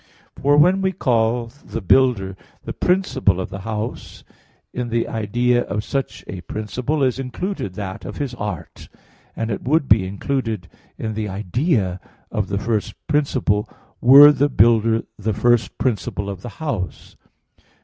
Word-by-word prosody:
For 145 +2 +3
when 180 +6 +5
we 190 0 +1
call 115 -4 +1
the - - -5
builder 100 -2 +2 0.3
the - - -4
principle 135 - +1
of 95 - -4
the 95 - -6
house, 110 +3 -5 0.5
in 125 -1 -3
the 115 0 0
idea 120 +3 +1
of 105 +2 -3
such 135 +3 -3
a 95 - -7
principle 125 - -2
is 130 0 +1
included 135 - -4
that 100 +1 -6
of - - -7
his 140 -4 -3
art; 100 -8 -6 0.5
and 115 0 -3
it 100 - -3
would 145 +1 +1
be 100 -3 +4
included 110 -1 -3 0.3
in 110 -1 -3
the 105 -1 -3
idea 100 - 0 0.3
of 105 -2 -1
the 100 - -2
first 105 0 -2
principle 130 -8 0 0.3
were 140 +4 +10
the 145 0 +1
builder 115 -1 +3 0.2
the 105 +1 -1
first 115 -1 +2
principle 105 -4 -2
of 95 -2 -8
the 120 - -7
house. 120 - -4
115 Hz, 150 wpm, -21 LUFS, 100-135 Hz, 0.5 s, were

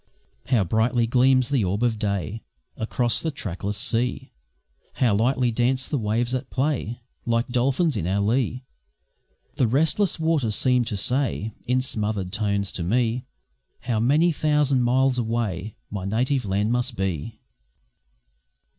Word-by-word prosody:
How 125 -6 +3
brightly 115 +5 +1
gleams 130 +1 +3
the 135 -6 +2
orb 100 +5 -1
of 115 -3 +1
day 100 0 -2 0.3
Across 120 +2 0
the 165 - -1
trackless 100 - -4
sea! 120 +3 -1 0.6
How 120 -5 +2
lightly 125 +3 +2
dance 125 +3 +1
the 145 - -1
waves 115 +3 0
that 130 0 -3
play 130 -4 -2 0.2
Like 115 +1 0
dolphins 135 +6 +1
in 85 - -2
our 95 +2 +1
lee! 125 +4 0 0.9
The 125 - +3
restless 160 - +1
waters 155 -10 +1
seem 125 0 +2
to 110 -3 -3
say, 115 -1 -1
In 125 +1 +2
smothered 105 -6 -2
tones 100 -1 0
to 85 - -3
me, 120 +5 0 0.5
How 115 -3 -1
many 150 +9 +3
thousand 150 -4 +2
miles 125 +1 +2
away 110 -4 -2 0.2
My 100 -3 -4
native 125 +5 0
land 100 +3 0
must 125 +1 -1
be! 95 +1 -3
120 Hz, 140 wpm, -24 LUFS, 105-130 Hz, 0.9 s, How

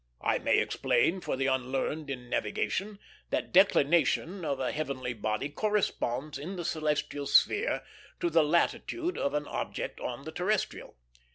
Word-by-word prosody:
I - - +2
may - - +3
explain 175 +10 +2
for - - -2
the 135 - 0
unlearned 135 +3 -1
in 125 -2 -5
navigation 195 - -1 0.3
that - - -2
declination 175 0 +4
of 140 -4 -1
a 130 - 0
heavenly 130 -5 -3
body 110 +3 -2
corresponds 150 - -1
in 175 +7 -5
the 175 -2 -5
celestial 150 -3 -1
sphere 415 +4 +3 0.4
to 345 -1 0
the 160 - +5
latitude 320 - 0
of 140 +1 -1
an 150 0 0
object - - -4
on 125 +2 -5
the 160 - -5
terrestrial. 190 +5 -1
150 Hz, 150 wpm, -30 LUFS, 135-185 Hz, 0.4 s, the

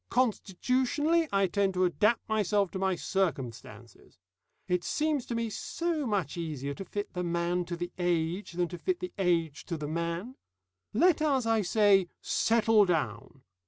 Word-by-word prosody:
Constitutionally, 255 - +1
I 195 0 +3
tend 195 +1 0
to 185 0 +3
adapt 205 +8 +1
myself 210 -3 +1
to 190 - -4
my 190 -1 +1
circumstances. 125 - -4 0.5
It 180 -1 0
seems 300 -4 0
to 235 - -3
me 230 -1 -2
so 330 +3 -2
much 190 - -1
easier 145 -4 -4
to 195 - -7
fit 205 +3 -5
the 180 -1 -2
man 175 +1 0
to 175 - -4
the 175 +1 -4
age 175 +2 -1
than 175 0 0
to 175 - -7
fit 370 -2 -1
the 365 - -6
age 165 -5 +1
to 170 - -3
the 150 -1 -5
man. 170 - -3 0.5
Let 325 - +3
us, 275 -5 +2
I 225 -1 +2
say, 195 -1 +4
settle 225 -2 +3
down. 135 - -2
190 Hz, 160 wpm, -29 LUFS, 170-230 Hz, 0.5 s, say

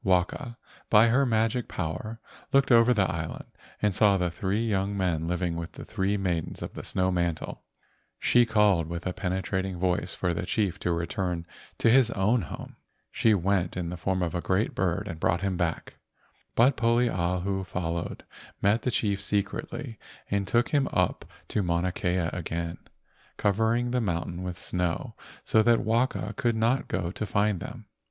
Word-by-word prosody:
Waka, 95 +6 0 0.3
by 110 +2 +6
her 135 +3 +3
magic 115 +1 +1
power, 110 +8 -4 0.3
looked 135 -1 +4
over 115 +1 +6
the 105 -5 +3
island 80 -1 -4 0.4
and 105 -2 +3
saw 100 0 +4
the 90 -2 0
three 100 +6 -1
young 100 -1 0
men 85 -4 0
living 90 -1 -1
with 85 0 -5
the - - -9
three 100 -1 0
maidens 90 -4 -2
of - - -6
the - - -7
snow 95 0 0
mantle. 85 -3 -2 0.6
She 120 - +4
called 105 -7 +3
with 85 0 -5
a 90 - -1
penetrating 95 0 -2
voice 90 0 0
for 90 - 0
the 85 - -3
chief 100 -3 0
to 90 - -1
return 85 0 -2 0.3
to - - +2
his 120 0 +6
own 110 +3 +2
home. 80 - -8 0.3
She 110 -2 +3
went 95 -1 0
in 85 -2 -2
the - - -4
form 95 +1 -1
of 85 - -2
a 85 - -1
great 95 +5 0
bird 95 +2 -1
and 85 -4 -6
brought 85 +2 +1
him 95 -1 0
back. 85 -2 -2 0.6
But 125 +4 +5
Poliahu 95 -5 +1
followed, 85 -1 -3 0.4
met 105 +4 +3
the - - -1
chief 100 -4 0
secretly 105 +5 -2 0.3
and 100 -1 0
took 120 +4 +2
him 140 -2 +2
up 90 -2 0 0.2
to 105 - +1
Mauna 85 0 0
Kea 90 -1 0
again, 85 -1 -3 0.6
covering 115 +4 +1
the 125 0 +1
mountain 85 -3 -2
with 90 -1 -4
snow 90 -3 -2 0.3
so 110 - +4
that 115 +1 +4
Waka 115 +4 0
could 120 -2 +1
not 115 +4 +1
go 90 -2 -2
to 105 - -4
find 100 -2 +1
them. 115 +3 -8
95 Hz, 175 wpm, -27 LUFS, 90-110 Hz, 0.6 s, by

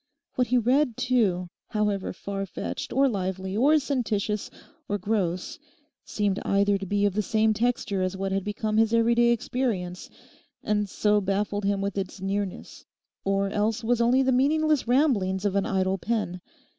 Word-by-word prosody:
What 250 -1 +1
he 250 - +2
read, 250 +1 +2
too, 210 -8 +1 0.2
however 210 -3 -1
far 195 +1 -5
fetched, - - -5
or 275 +2 +3
lively, 190 -3 -3
or 285 +8 +4
sententious, 220 -8 -1 0.4
or 205 - 0
gross, 185 -3 -2 0.4
seemed 205 -2 -1
either 200 0 +2
to 195 - -6
be 205 +2 +1
of 200 - +1
the 210 - +1
same 220 +1 +2
texture 225 -3 -1
as 185 +1 -1
what 195 0 -2
had 195 0 0
become 215 +1 -2
his 225 +1 +3
everyday 235 +1 +4
experience, 220 -7 -2 0.5
and 210 -1 0
so 210 +2 +2
baffled 200 +1 -1
him 200 0 +1
with 200 0 -2
its 190 +1 -5
nearness, 195 0 -4 0.4
or 195 0 0
else 220 +3 0
was 235 +1 +1
only 250 +3 +4
the 260 - +2
meaningless 300 +2 +2
ramblings 220 -8 +2
of 200 -1 0
an 200 - +1
idle 190 0 0
pen. 205 -4 -2
205 Hz, 165 wpm, -26 LUFS, 195-235 Hz, 0.5 s, or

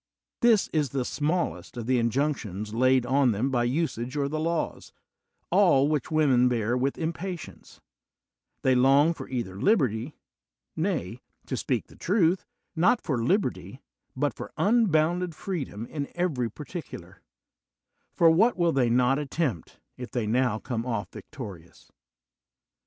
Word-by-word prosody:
This 230 -4 +4
is 150 -4 +1
the 130 0 -2
smallest 155 -2 -2
of 120 - -4
the 125 0 +2
injunctions 115 -5 -1
laid 130 +1 +3
on 130 -1 +3
them 125 +7 -1
by 120 -2 +1
usage 130 -2 -2
or 140 -1 +1
the 155 +2 -3
laws, 165 +1 -2 0.6
all 170 -8 +5
which 150 -4 -1
women 135 -6 +3
bear 120 -1 0
with 135 +2 -1
impatience: 170 +1 -6 0.8
they 130 - +4
long 135 +6 +4
for - - -9
either 110 -7 -4
liberty 135 - +1 0.3
— - - -66 0.2
^nay, 160 - -2 0.3
to - - -3
speak - - -1
the - - -18
truth, 180 -1 +1 0.3
not 180 +9 +3
for 125 -6 -2
liberty, 195 - -1 0.4
but - - 0
for - - -8
unbounded 180 -6 +2
freedom 140 - -5
in 140 +2 -5
every 150 -10 0
particular; 110 - -9 0.9
for 165 -1 +5
what 220 +9 +3
will 170 -2 +3
they 130 -5 +2
not 125 +3 +3
attempt 140 - -3 0.2
if 125 -1 -7
they 120 -3 -2
now 120 0 +1
come 115 +1 -3
oflp 115 -3 -3
victorious? 100 - -11
135 Hz, 140 wpm, -27 LUFS, 120-165 Hz, 0.9 s, all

